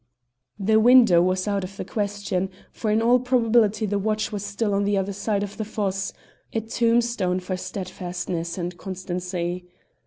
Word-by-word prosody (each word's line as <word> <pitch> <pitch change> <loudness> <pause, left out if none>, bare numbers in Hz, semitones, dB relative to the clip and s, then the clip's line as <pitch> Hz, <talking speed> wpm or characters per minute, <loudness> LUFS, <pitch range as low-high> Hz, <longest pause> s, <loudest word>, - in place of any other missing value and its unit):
The 215 +2 +4
window 230 -7 +7
was 185 +2 +1
out 200 -2 0
of 190 +1 -8
the - - -4
question, 200 -2 -2 0.2
for 220 - -3
in 220 +2 +2
all 245 +2 +5
probability 230 -4 +2
the 205 0 0
watch 215 +1 -1
was 205 -2 -4
still 205 +1 -1
on 200 0 +2
the 200 0 +1
other 195 +1 -1
side 200 +1 -1
of 205 -1 -6
the 220 - -2
fosse 195 -2 -2 0.4
a 225 - 0
tombstone 230 -4 +1
for 185 +1 -3
steadfastness 180 -2 -4
and 175 0 -3
constancy. 180 -1 -4
200 Hz, 165 wpm, -24 LUFS, 185-220 Hz, 0.4 s, window